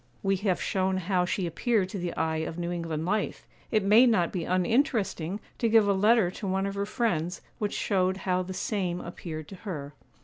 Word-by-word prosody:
We 195 0 +2
have 190 -2 0
shown 190 0 0
how 180 0 +1
she 185 +1 -1
appeared 190 +3 0
to 195 - -5
the 175 -1 -2
eye 160 0 0
of 160 +1 -3
New 175 0 -2
England 165 -2 -3
life; 210 +3 -1 0.2
it 215 -3 +2
may 215 +6 +7
not 185 -8 +2
be 175 -4 -3
uninteresting 195 - +1 0.2
to 230 - +2
give 220 -2 +5
a 200 - +4
letter 210 -1 +4
to 195 - -6
one 190 +1 0
of 200 - -2
her 200 0 -2
friends, 185 -7 -1 0.2
which 210 -1 -1
showed 190 -2 +1
how 185 -1 +2
the 185 +1 -6
same 180 -5 -1
appeared 160 -3 -7
to 195 - -9
her. 150 -8 -6
190 Hz, 205 wpm, -28 LUFS, 175-205 Hz, 0.2 s, may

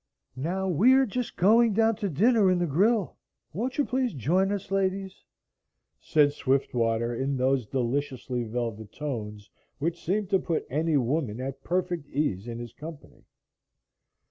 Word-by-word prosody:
"Now, 180 +8 -2
we 190 - +5
are 265 0 +5
just 250 +2 -4
going 225 +4 +5
down 225 +1 +3
to 205 -3 -2
dinner 205 - +4
in 185 - +3
the 175 - +1
grill; 195 - +1 0.4
won't 245 +9 -3
you 290 - +2
please 255 -6 -1
join 180 - +1
us, 200 -1 -4
ladies?" 195 0 -1 0.8
said 145 -3 +3
Swiftwater 120 -4 0
in 135 +3 -1
those 130 -2 +1
deliciously 130 0 -2
velvet 110 -2 -4
tones 105 -8 -5 0.3
which 165 +4 -3
seemed 200 +2 -1
to 190 - +4
put 165 -3 -2
any 155 +2 +1
woman 125 -3 -1
at 135 +1 -5
perfect 175 -4 -2
ease 120 -8 -1
in 115 -1 -5
his 120 -1 -8
company. 155 -1 -11
155 Hz, 150 wpm, -27 LUFS, 130-195 Hz, 0.8 s, we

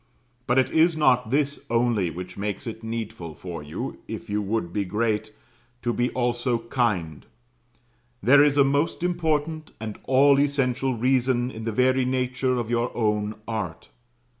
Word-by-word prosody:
But 125 0 +2
it 130 - +3
is 160 0 +4
not 125 -6 +3
this 140 +2 0
only 115 -6 +2
which 90 +3 -7
makes 100 +1 -4
it 115 -1 -6
needful 110 -8 -5
for 85 -4 -7
you, 75 +1 -6
if - - -7
you 105 +1 0
would 100 -4 -2
be 100 - 0
great, 110 +2 -1 0.5
to 120 - 0
be 120 +1 +1
also 120 0 0
kind; 110 - -1 1.0
there 140 +4 +6
is 145 -1 +2
a 140 - +7
most 140 +5 0
important 160 -3 -1
and 110 -1 -6
all 140 +1 +5
essential 135 -2 +1
reason 125 +1 +1
in 110 -2 -7
the 115 - -1
very 130 +3 +3
nature 130 0 0
of 120 -2 -3
your 120 +1 +1
own 105 -2 0
art. 105 -8 -4
120 Hz, 160 wpm, -25 LUFS, 105-135 Hz, 1.0 s, a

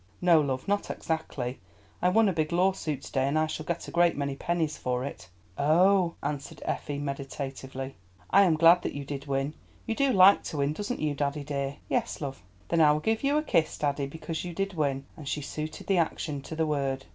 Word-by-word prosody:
"No, 170 -3 +5
love, 130 -3 -2
not 205 0 0
exactly. 135 -6 -3 0.4
I 180 - +4
won 225 +4 +4
a 195 - +2
big 155 -1 -1
lawsuit 170 -6 0
to - - -9
day, 135 0 +1
and 145 +3 +1
I 155 - +3
shall 155 0 -5
get 170 0 -3
a - - -7
great 175 -2 +3
many 140 -1 -2
pennies 160 0 -1
for 125 0 -2
it." 90 -10 -8 0.3
"Oh," 175 +4 +4
answered 145 -2 -4
Effie 145 -1 -2
meditatively, 135 -1 -5 0.4
"I 200 - +7
am 180 -5 +4
glad 170 +2 +7
that - - -4
you 145 -1 -5
did 140 0 -6
win. 135 +1 -1 0.3
You - - -1
do 275 +3 +2
like 195 -2 +7
to 155 - -4
win, 140 +1 +1
doesn't 205 +9 -4
you, 150 -1 +1
daddy, 145 +1 -2
dear." 140 -1 -3
"Yes, - - -1
love." 135 -7 -5 0.3
"Then 170 -1 +3
I 150 -1 +7
will 150 - 0
give 220 - 0
you 285 +2 +3
a 305 - +1
kiss, 165 - +1
daddy, 140 -1 -1
because 160 +2 -5
you 175 -2 -6
did 195 +1 -1
win," 140 -4 -1
and 150 - -10
she 150 - -2
suited 155 +2 -5
the 195 -3 +2
action 150 -3 -1
to 160 - -7
the 160 0 +1
word. 135 -3 -1
150 Hz, 220 wpm, -28 LUFS, 140-175 Hz, 0.4 s, I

